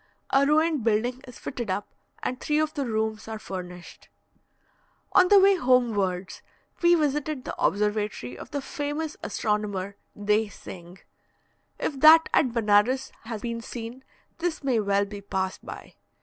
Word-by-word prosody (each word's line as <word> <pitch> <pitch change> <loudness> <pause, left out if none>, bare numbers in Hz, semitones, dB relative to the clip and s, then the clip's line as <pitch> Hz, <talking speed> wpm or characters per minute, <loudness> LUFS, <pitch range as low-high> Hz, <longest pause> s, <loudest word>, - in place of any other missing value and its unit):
A 275 +1 +4
ruined 310 -2 +2
building 235 +3 0
is 250 - -11
fitted 240 -4 -5
up, 200 +2 -2 0.4
and 255 - -2
three 300 - 0
of 310 0 +1
the 280 -4 -2
rooms 220 -1 -2
are 220 0 -5
furnished. 180 -4 -9 1.0
On 365 - +6
the 405 +1 +7
way 395 +1 +6
homewards, 210 - +1 0.4
we 345 0 +6
visited 295 -3 -1
the - - -4
observatory 210 - 0
of - - -10
the 285 -2 -4
famous 295 0 -3
astronomer, 205 -2 -2 0.2
Dey 210 +1 +2
Singh. 180 -2 -11 0.8
If 275 - -3
that 315 +3 +8
at 260 -6 +3
Benares 230 +3 +2
has 225 -2 -6
been 230 -1 -3
seen, 235 +2 -7 0.4
this 335 -3 -2
may 255 -4 +2
well 200 -1 +2
be 200 0 -8
passed 190 -1 -3
by. - - -9
230 Hz, 150 wpm, -26 LUFS, 205-290 Hz, 1.0 s, that